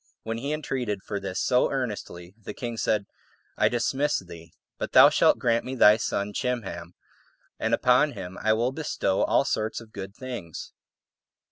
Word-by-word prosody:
When 115 +1 -3
he 140 +4 -3
entreated 125 -9 -3
for 100 - -4
this 95 -1 -4
so 125 - +2
earnestly, 105 -9 -5
the 110 - -9
king 120 -3 -5
said, 105 -2 0 0.5
"I - - +3
dismiss 135 +4 0
thee, 85 -3 -10 0.3
but - - -4
thou - - +9
shalt - - +4
grant 115 -1 +1
me 130 - -5
thy 105 -3 +7
son 105 -2 -2
Chimham, 95 -9 -4 0.6
and - - -1
upon 130 +4 +3
him 95 -2 -7
I 110 0 +3
will 120 +3 0
bestow 135 -10 -1
all - - +3
sorts 110 +1 -1
of 115 -2 -15
good 100 0 -7
things." 120 - -7
110 Hz, 165 wpm, -26 LUFS, 95-125 Hz, 0.6 s, thou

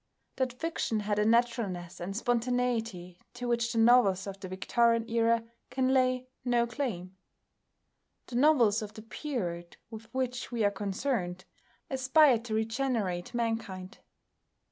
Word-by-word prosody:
That 260 -1 0
fiction 320 -9 -1
had 205 0 -1
a 210 - +2
naturalness 225 -7 0
and 195 +3 -4
spontaneity 235 -7 -1 0.2
to 245 0 -4
which 235 -1 +1
the 235 - -3
novels 225 -5 +5
of 195 -1 -7
the 190 - -7
Victorian 230 +5 +1
Era 230 0 +2 0.3
can 260 +1 +1
lay 255 -1 +2 0.2
no 240 -1 +2
claim. 215 -8 -4 1.1
The 240 - -4
novels 245 -7 +4
of 210 -1 -7
the 220 - -9
period 190 - -5
with 225 +1 -10
which 255 -1 -3
we 235 -2 0
are 205 - +3
concerned 195 -2 -2 0.4
aspire 265 -1 +4
to 225 -1 -4
regenerate 225 -4 -1
mankind. 225 -5 -3
230 Hz, 135 wpm, -30 LUFS, 200-250 Hz, 1.1 s, novels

